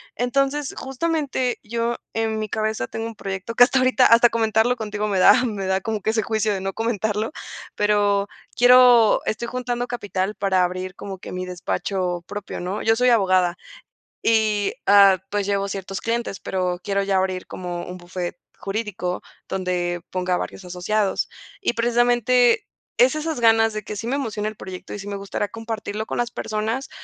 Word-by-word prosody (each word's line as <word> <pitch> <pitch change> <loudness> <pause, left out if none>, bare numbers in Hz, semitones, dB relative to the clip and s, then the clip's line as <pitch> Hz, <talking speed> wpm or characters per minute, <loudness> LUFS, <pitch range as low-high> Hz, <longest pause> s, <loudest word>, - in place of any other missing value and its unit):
entonces 275 +3 0
justamente 270 -2 -1
yo 235 +2 -1 0.2
en 220 -1 -1
mi 215 - -2
cabeza 215 - -1
tengo 225 - -5
un 230 - -8
proyecto 195 +2 -5
que, 245 - +8
hasta 265 +2 +3
ahorita 255 0 +4
hasta 230 +1 +7
comentarlo 225 +1 +2
contigo 210 -2 -3
me 200 -3 0
da 245 +6 +6
me 205 -5 -3
da 190 0 0
como 220 0 -3
que 220 - +1
ese 220 0 +1
juicio 220 -1 0
de 190 - -3
no 195 0 -3
comentarlo 220 +1 -1 0.4
pero 205 -1 +2 0.3
quiero 245 -2 +6
estoy 235 +2 -2
juntando 245 0 -3
capital 205 -4 -3
para 190 -2 +2
abrir 185 +1 -3
como 195 -1 -7
que - - -10
mi 185 0 -3
despacho 180 0 -2
propio, 205 0 -6
¿no?, 185 +4 -3
yo 225 0 +3
soy 250 +2 +3
abogada, 185 -6 +3 0.7
y 215 -2 +2
ah, 200 -1 +7
pues 205 -1 -1
llevo 200 0 0
ciertos 195 -1 -5
clientes, 230 -3 -2
pero 180 -1 -2
quiero 200 -1 0
ya 195 -1 +1
abrir 185 -1 -1
como 175 -1 -5
un 180 - -7
bufete 175 0 -6 0.2
jurídico 195 -3 -3 0.3
donde 180 -2 -2
ponga 180 -1 -1
varios 190 - -6
asociados 190 +3 -1 0.3
y 380 - +1
precisamente 240 - +3 0.3
es 255 +4 +5
esas 310 -4 -3
ganas 225 -1 +4
de 215 0 -4
que 210 - -6
sí 225 - -5
me 260 - 0
emociona 215 -6 -2
el 215 - -5
proyecto 185 -1 -8
y - - -6
sí 200 - -8
me 200 - -4
gustaría 200 +1 -3
compartirlo 220 -1 -5
con - - -4
las 240 0 -1
personas, 220 +6 -3
215 Hz, 180 wpm, -22 LUFS, 190-235 Hz, 0.7 s, que